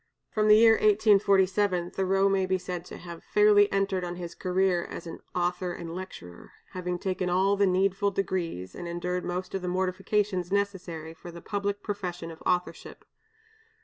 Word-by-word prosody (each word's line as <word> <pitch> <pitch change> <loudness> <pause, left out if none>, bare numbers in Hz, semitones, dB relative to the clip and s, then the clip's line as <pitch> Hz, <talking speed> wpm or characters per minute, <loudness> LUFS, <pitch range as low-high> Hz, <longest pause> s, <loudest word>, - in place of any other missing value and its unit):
From 215 -1 +1
the 210 - +8
year 225 0 +7
1847 200 -3 +3
Thoreau 195 +1 +2
may 195 -1 +1
be 185 0 +1
said 180 -1 -6
to - - -9
have 170 -1 -10
fairly 210 -1 +4
entered 195 -2 0
on 175 0 -4
his 175 -1 -7
career 185 -1 +1
as 170 - -8 0.3
author 180 0 -1
and 165 -1 -7
lecturer; 175 - -9 0.2
having 180 -1 -3
taken 185 0 -2
all 190 +3 +3
the 200 0 +3
needful 195 +2 +2
degrees 175 - -3
and 175 - -7
endured 180 +1 -3
most 180 +1 -4
of 195 - -2
the 180 - -4
mortifications 185 0 -1
necessary 185 -5 -2
for 170 +2 -11
the 170 0 -9
public 200 +2 -3
profession 180 -5 -4
of 160 - -13
authorship. 180 0 -2
185 Hz, 165 wpm, -28 LUFS, 175-200 Hz, 0.3 s, the